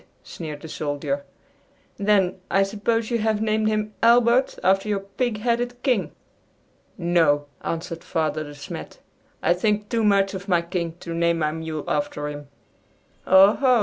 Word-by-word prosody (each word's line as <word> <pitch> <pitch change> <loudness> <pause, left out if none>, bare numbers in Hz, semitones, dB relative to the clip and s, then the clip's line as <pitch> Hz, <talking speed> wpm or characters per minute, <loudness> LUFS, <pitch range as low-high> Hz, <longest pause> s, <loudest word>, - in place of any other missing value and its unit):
sneered 155 -3 -7
the - - -6
soldier; 155 - -3 0.7
"then, 200 -3 +2
I 195 - +3
suppose 215 +3 -1
you 235 - +1
have 215 -1 +1
named 215 0 +1
him 215 0 -1
Albert 235 +2 +4
after 195 +3 +2
your 200 -2 0
pig 210 +2 -3
headed 245 +1 -1
King!" 225 - +1 0.9
"No," 165 -4 +2 0.2
answered 165 0 -4
Father 155 -2 -1
De 145 -1 -10
Smet, 140 0 -8 0.5
"I - - +4
think 210 +3 0
too 230 -2 0
much 200 -1 +3
of 195 +1 -6
my 175 -3 +2
King 170 -1 -3
to 170 - -5
name 170 0 +1
my 155 -2 0
mule 160 -1 -5
after 150 0 -2
him." 145 -1 -8 0.8
"Oh, 190 +2 +7
ho!" 255 -3 +3
195 Hz, 155 wpm, -23 LUFS, 165-215 Hz, 0.9 s, Oh